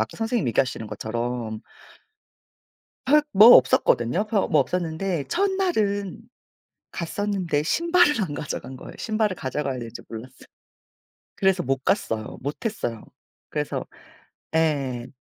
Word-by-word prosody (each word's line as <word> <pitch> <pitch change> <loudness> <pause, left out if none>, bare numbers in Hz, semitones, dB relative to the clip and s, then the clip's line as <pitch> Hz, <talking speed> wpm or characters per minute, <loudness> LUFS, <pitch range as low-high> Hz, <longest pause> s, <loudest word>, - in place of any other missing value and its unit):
아까 110 - -3
선생님 225 - -1
얘기하시는 115 -1 0
것처럼. 115 0 -4 1.4
별 295 +3 +5
뭐 210 +4 +9
없었거든요. 145 - +2
별 210 -2 0
뭐 150 - +4
없었는데 170 +1 -2
첫날은 340 - 0 0.7
갔었는데 180 -3 -2
신발을 340 - +3
안 150 -6 -3
가져간 140 -3 -5
거예요. - - -10
신발을 215 -3 0
가져가야 135 -1 -3
되는지 115 -2 -8
몰랐어요. 125 +3 -10 0.9
그래서 190 -2 +2
못 135 0 -1
갔어요. 110 - -1
못 145 - -5
했어요. 120 - -3 0.5
그래서 - - -3 0.7
예 135 -7 0
160 Hz, 285 characters per minute, -24 LUFS, 125-210 Hz, 1.4 s, 뭐